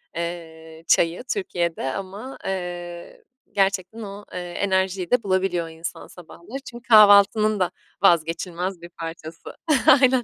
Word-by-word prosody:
eee, 160 Hz, -1 st, -7 dB
çayı 170 Hz, +7 st, +2 dB
Türkiye'de 175 Hz, -, -2 dB
ama, 200 Hz, +7 st, -7 dB
eee, 175 Hz, -2 st, -6 dB, 0.3 s
gerçekten 195 Hz, +2 st, 0 dB
o, 205 Hz, 0 st, -8 dB
eee, 180 Hz, -, -4 dB
enerjiyi 190 Hz, 0 st, -1 dB
de 250 Hz, -3 st, +3 dB
bulabiliyor 185 Hz, -3 st, 0 dB
insan 165 Hz, +2 st, -7 dB
sabahları, 180 Hz, +8 st, -10 dB
çünkü 240 Hz, -1 st, -12 dB
kahvaltının 215 Hz, -1 st, +6 dB
da 180 Hz, -, +1 dB, 0.3 s
vazgeçilmez 170 Hz, +1 st, +1 dB
bir 170 Hz, -, -10 dB
parçası. 165 Hz, -1 st, -9 dB, 0.5 s
Aynen. 255 Hz, -1 st, +4 dB
185 Hz, 115 wpm, -23 LUFS, 170-200 Hz, 0.5 s, kahvaltının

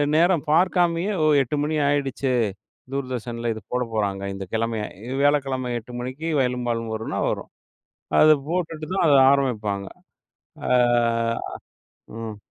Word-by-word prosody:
நேரம் 170 Hz, -1 st, +3 dB
பார்க்காமயே 175 Hz, +2 st, +2 dB, 0.3 s
"8:00 135 Hz, +3 st, -2 dB
மணி 155 Hz, +1 st, -1 dB
ஆகிடுச்சு 135 Hz, -2 st, 0 dB, 0.6 s
தூர்தர்ஷனில 120 Hz, -3 st, -3 dB
இது 110 Hz, -, -9 dB
போடப் 125 Hz, -2 st, -2 dB
போறாங்க." 100 Hz, -2 st, -1 dB
"இந்த 95 Hz, 0 st, -6 dB
கிழமையை 110 Hz, -1 st, -1 dB, 0.3 s
வியாழக்கிழமை 135 Hz, -3 st, +1 dB
8:00 120 Hz, +2 st, -13 dB
மணிக்கு 130 Hz, +6 st, -5 dB
'வயலும் 125 Hz, -1 st, 0 dB
வாழ்வும்' 115 Hz, -1 st, -2 dB
வரும்னா 110 Hz, -, -3 dB, 0.7 s
வரும்"அதை 155 Hz, -1 st, +4 dB
போட்டுட்டு 165 Hz, -3 st, -3 dB
தான் 185 Hz, -, +2 dB
அதை 140 Hz, -2 st, +6 dB
ஆரம்பிப்பாங்க. 105 Hz, -8 st, -1 dB, 0.8 s
ஆ. -, -, +1 dB, 1.5 s
ம். 110 Hz, -2 st, -6 dB
130 Hz, 115 wpm, -23 LUFS, 115-150 Hz, 1.5 s, அதை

